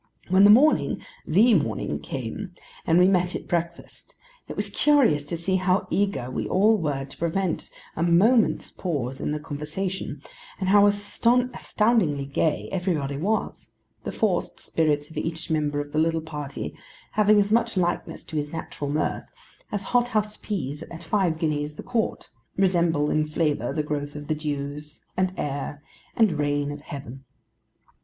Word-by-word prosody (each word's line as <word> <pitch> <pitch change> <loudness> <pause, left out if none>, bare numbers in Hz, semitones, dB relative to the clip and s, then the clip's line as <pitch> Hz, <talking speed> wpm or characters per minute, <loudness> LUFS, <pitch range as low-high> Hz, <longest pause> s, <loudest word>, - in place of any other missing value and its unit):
When 190 +2 +6
the - - +8
morning—the 245 - +4
morning—came, 125 - -2 0.3
and 165 - +4
we 180 +1 +6
met 180 -2 +2
at - - -6
breakfast, 170 0 -4 0.3
it - - -6
was - - -2
curious 270 - +4
to 170 - -3
see 185 +3 0
how 185 +1 +1
eager 190 -12 0
we - - -2
all 210 +3 +4
were 145 -4 -2
to 135 - -13
prevent 170 +1 -1 0.3
a - - -3
moment's 200 +8 +3
pause 135 -7 -3
in - - -1
the 150 - -2
conversation, 155 +6 -4 0.4
and 190 - -1
how 205 +1 +7
astoundingly 215 - +1
gay 145 +2 0
everybody 170 -7 -1
was: 200 +10 -2 0.3
the - - -3
forced - - -1
spirits 150 -2 0
of - - -10
each 165 0 -3
member 150 -2 0
of 145 0 -5
the 155 - 0
little 165 0 +2
party 150 -3 -6 0.4
having 215 0 +4
as 205 0 +2
much 230 -2 +2
likeness 175 -1 -1
to 160 - -6
his 150 0 -2
natural 150 -3 -5
mirth, 150 +2 -1 0.4
as 205 -1 -2
hot 245 +2 +2
house 215 -2 -1
peas 150 -8 -4
at 165 0 -9
five 185 -6 +1
guineas 150 -2 -1
the - - -8
quart, 230 -3 -2 0.3
resemble 170 -6 +2
in 155 - +2
flavour 150 -6 0
the 155 - -1
growth 145 -1 -3
of 145 -1 -7
the - - +3
dews, 150 0 -5
and 185 0 +1
air, 145 0 -4 0.3
and 200 -10 +3
rain 145 0 0
of 145 0 -7
Heaven. 135 -2 -8
165 Hz, 160 wpm, -25 LUFS, 145-195 Hz, 0.4 s, the